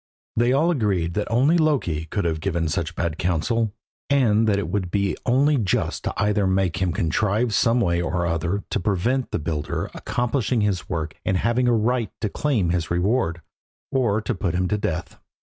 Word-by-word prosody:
They 120 +2 +3
all 155 +6 +3
agreed 100 - 0
that 105 +3 -2
only 140 +9 +3
Loki 125 - +1
could 100 +4 -2
have 80 -2 0
given 85 -2 -1
such 85 0 -2
bad 85 -1 -2
counsel, 95 +6 0 0.4
and 115 -6 +3
that 100 -2 +3
it 100 -4 -2
would 95 0 -2
be 100 +1 0
only 140 +4 +3
just 105 -7 -1
to - - -1
either 105 -1 +2
make 95 -2 +1
him 90 -2 +1
contrive 105 +8 0
some 115 +2 +3
way 85 -6 +1
or 85 +1 -1
other 85 +4 -1
to - - 0
prevent 110 +8 0
the - - -1
builder 75 -1 -3
accomplishing 120 -1 -1
his 100 -3 -1
work 80 -3 -3
and 95 - +1
having 120 +5 +1
a 120 - +4
right 115 +1 +1
to 105 - 0
claim 110 - 0
his 85 -2 -1
reward, 90 -1 0 0.5
or 115 -5 +1
to 115 - -2
put 90 -4 -2
him 90 0 +1
to 105 - +1
death. 85 -3 -3
100 Hz, 190 wpm, -23 LUFS, 85-120 Hz, 0.5 s, a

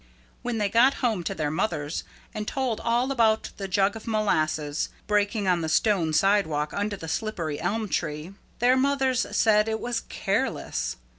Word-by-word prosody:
When 245 -2 -2
they 210 -2 +1
got 235 +6 +4
home 215 -7 0
to - - -2
their 150 -2 -1
mothers 160 -3 -2 0.3
and 210 0 -4
told 260 -5 -1
all 240 +3 +1
about 225 -4 +2
the 195 - -4
jug 195 +1 +2
of 225 - -9
molasses 155 -9 0 0.2
breaking 205 0 +1
on 180 -2 +2
the 160 - -2
stone 175 -2 +2
sidewalk 160 -4 +2
under 205 0 -2
the 165 - -8
slippery 165 -5 -3
elm 215 +6 -1
tree, 160 0 -3 0.2
their 245 +2 +4
mothers 265 -1 +1
said 215 0 +4
it 220 0 -1
was 240 -1 -2
careless. - - -1
205 Hz, 165 wpm, -26 LUFS, 160-225 Hz, 0.3 s, got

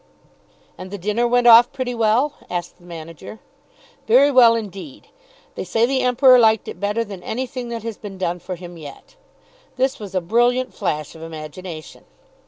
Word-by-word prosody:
"And 185 - -8
the 200 - -6
dinner 210 +6 0
went 245 0 +2
off 240 +1 +8
pretty 255 -3 -4
well?" 235 +5 +1 0.2
asked 175 0 -5
the 175 - -20
manager. 165 +4 -10 0.7
"Very 265 +6 +5
well, 240 -3 +6
indeed. 225 +6 -7 0.5
They - - -5
say 230 +1 +1
the 265 +1 0
Emperor 255 0 +5
liked 220 -2 +3
it - - -8
better 210 +3 -1
than 200 -4 -9
anything 250 +3 -5
that 230 -2 -5
has 230 -2 -5
been 200 -2 -9
done 180 -1 -2
for 185 +1 -6
him 175 0 -11
yet." 150 - -12 0.6
This 265 +1 0
was 200 -3 -8
a - - +3
brilliant 240 +7 +1
flash 150 -1 -3
of 160 - -13
imagination. 160 +1 -9
220 Hz, 175 wpm, -20 LUFS, 180-245 Hz, 0.7 s, off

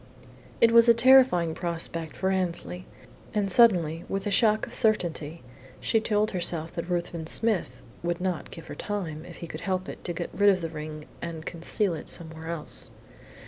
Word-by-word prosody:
It 230 - +6
was 230 0 +7
a 235 - +8
terrifying 240 -9 +5
prospect 165 -2 -4
for 190 0 0
Annesley, 180 -1 -2 0.5
and 200 -2 +1
suddenly, 175 -8 +4
with 195 0 -2
a 205 - -1
shock 215 +2 +3
of - - -10
certainty, 170 - 0 0.4
she 225 - +1
told 215 0 +1
herself 170 -3 -1
that 170 +1 -5
Ruthven 170 -2 -2
Smith 220 +1 0 0.2
would 175 0 -2
not 180 -2 -2
give 165 - -10
her - - -8
time, 170 -7 -4
if 175 -1 -10
he 170 - -7
could - - -7
help 185 -1 -2
it, - - -8
to 175 - -2
get 170 +1 -5
rid 205 +2 +5
of 185 -2 +3
the 165 - -3
ring 155 -1 -7 0.2
and 165 -1 -6
conceal 175 +3 -1
it 160 - -7
somewhere 160 -1 -6
else. 165 -2 -5
175 Hz, 185 wpm, -27 LUFS, 165-205 Hz, 0.5 s, a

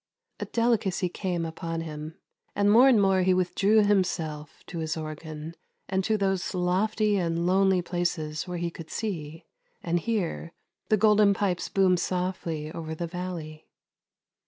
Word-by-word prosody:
A - - -3
delicacy 225 -6 +1
came 175 -2 -2
upon 165 0 -4
him, 155 +1 -7 0.4
and 205 0 +3
more 245 +5 +7
and 240 -5 +5
more 195 -1 +3
he 185 0 +3
with 180 -1 0
drew 210 +3 +4
himself 165 -7 -1
to 170 - -6
his 160 0 -2
organ, 155 0 -6 0.3
and 190 0 0
to 220 -1 +2
those 195 -2 -1
lofty 205 +4 +1
and 170 -2 0
lonely 190 0 +3
places 170 -3 -2
where 180 0 -4
he 170 0 -2
could 165 -1 -10
see 165 -6 -5 0.2
— - - -42
and 175 0 +1
hear 175 -4 -2 0.2
— - - -50
the 215 - +4
Golden 210 -1 +5
Pipes 185 -3 -1
boom 190 -2 +3
softly 175 -4 -2
over 160 -1 -5
the 170 - -3
valley. 170 -3 -6
180 Hz, 160 wpm, -27 LUFS, 165-195 Hz, 0.4 s, more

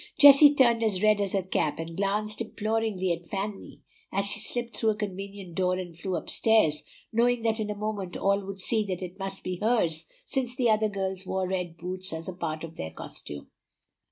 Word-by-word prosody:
Jessie 285 +1 +9
turned 235 -4 +4
as 210 -4 0
red 215 -1 +4
as 200 -2 -1
her 195 -2 +1
cap, 155 -5 0
and 165 +1 -6
glanced 210 +3 -1
imploringly 220 -4 -1
at 170 0 -8
Fanny 200 +1 -5 0.3
as 195 +1 0
she 205 +2 -1
slipped 235 +2 -3
through 225 - +1
a 215 - +2
convenient 195 -2 -6
door 180 +1 +1
and 180 -2 -6
flew 180 +3 -3
up 165 - -4
stairs, 220 -10 +3 0.3
knowing 240 +1 +2
that 225 0 +1
in 215 -1 -2
a 210 - -2
moment 205 -3 -4
all 200 +1 +1
would 195 0 -7
see 220 +2 +1
that 185 -2 -3
it 180 +2 -8
must 195 0 -5
be 180 -1 -3
hers, 175 -7 +1 0.2
since 255 -2 -1
the 245 -4 +3
other 215 0 +2
girls 190 -1 -2
wore 190 -1 -1
red 180 -3 -3
boots 185 +1 -3
as 160 0 -5
a 185 - -4
part 160 -3 -4
of 165 0 -8
their 80 - -4
costume. 75 -2 -9
195 Hz, 210 wpm, -28 LUFS, 180-220 Hz, 0.3 s, Jessie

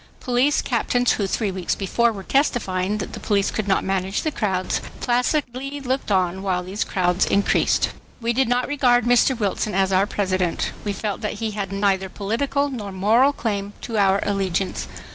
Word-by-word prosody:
Police 255 +4 +2
captains 245 0 +1
who 200 - 0
three 205 +1 -1
weeks 185 -2 -2
before 235 +4 +1
were 200 -3 -7
testifying 205 -7 0
that 200 - -5
the - - -6
police 200 -2 +1
could 215 -2 -3
not 190 - +2
manage 190 +1 -1
the 310 - 0
crowds, 190 -8 -1 0.2
placidly 255 +2 -1
looked 260 -4 -2
on 185 -1 +1
while 185 -2 -1
these 195 +3 -2
new - - -13
crowds 180 0 +2
increased. 200 0 +2 0.3
We 235 0 0
did 260 +1 +2
not 245 +1 +1
regard 250 -5 +3
Mr. 245 +1 +4
Wilson 210 -1 -1
as 190 0 +2
our 190 +2 +3
President. 185 -4 -1
We 205 - -1
felt 205 +1 -3
that 210 - -2
he 220 0 -3
had 200 -2 -4
neither 195 -1 +1
political 275 +9 -1
nor 210 -6 -5
moral 220 +9 +3
claim 205 -6 -3
to 225 -3 -2
our 195 0 +4
allegiance. 195 -2 -1
205 Hz, 180 wpm, -22 LUFS, 195-245 Hz, 0.3 s, Mr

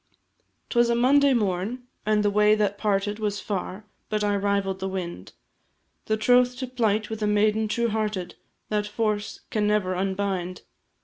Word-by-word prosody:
'Twas 240 -1 +3
a 235 - +2
Monday 275 +4 +4
morn, 215 +1 -1 0.2
and 210 -1 +3
the 205 - +2
way 210 +1 +4
that 205 -1 0
parted 205 0 0
Was 205 -1 -1
far, 195 0 -4 0.2
but 215 -1 -1
I 205 0 +1
rivall'd 200 -1 0
the 190 0 -3
wind, 170 - -6 0.7
The 215 - +1
troth 245 +3 +3
to 260 - -3
plight 220 -4 0
with 220 0 -5
a 210 - +1
maiden 210 +1 +2
true 235 +2 0
hearted, 210 -5 -2 0.4
That 210 -1 0
force 210 -1 -2
can 210 -1 +1
never 210 -3 +1
unbind. 190 -1 -2
210 Hz, 165 wpm, -25 LUFS, 195-220 Hz, 0.7 s, Monday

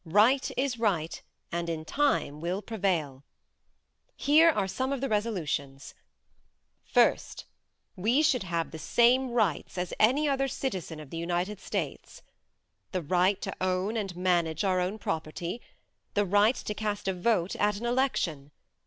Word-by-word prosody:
Right 210 +10 +3
is 260 -3 0
right 175 -8 0 0.3
and 170 0 -2
in 160 -1 -4
time 275 - 0
will 180 +4 -2
prevail. 175 - -1 0.9
Here 310 +4 +5
are 205 -11 +1
some 260 +7 -2
of 275 - -1
the 270 - -1
resolutions: 170 - -2 0.9
First: - - +1 0.5
We 235 +11 +2
should 260 -6 +3
have 170 -3 -2
the 160 - -8
same 245 +9 +3
right 220 -10 +1
as 180 -1 -3
any 270 +8 +4
other 270 -1 +1
citizen 185 - -4
of 150 -3 -11
the 165 - -5
United 175 +4 -2
States. - - -5 0.7
The 185 -3 -2
right 185 +5 +2
to 195 - -4
own 185 +3 0
and 195 -5 -3
manage 175 -3 +1
our 185 -2 +2
own 185 +4 -1
property. 170 +3 -4 0.5
The 205 0 +3
right 205 +5 +4
to 210 - -4
cast 210 -2 -3
a 190 - +1
vote 180 -1 0
at 205 0 +1
an 230 - -5
election. 235 - 0
195 Hz, 150 wpm, -28 LUFS, 170-235 Hz, 0.9 s, Here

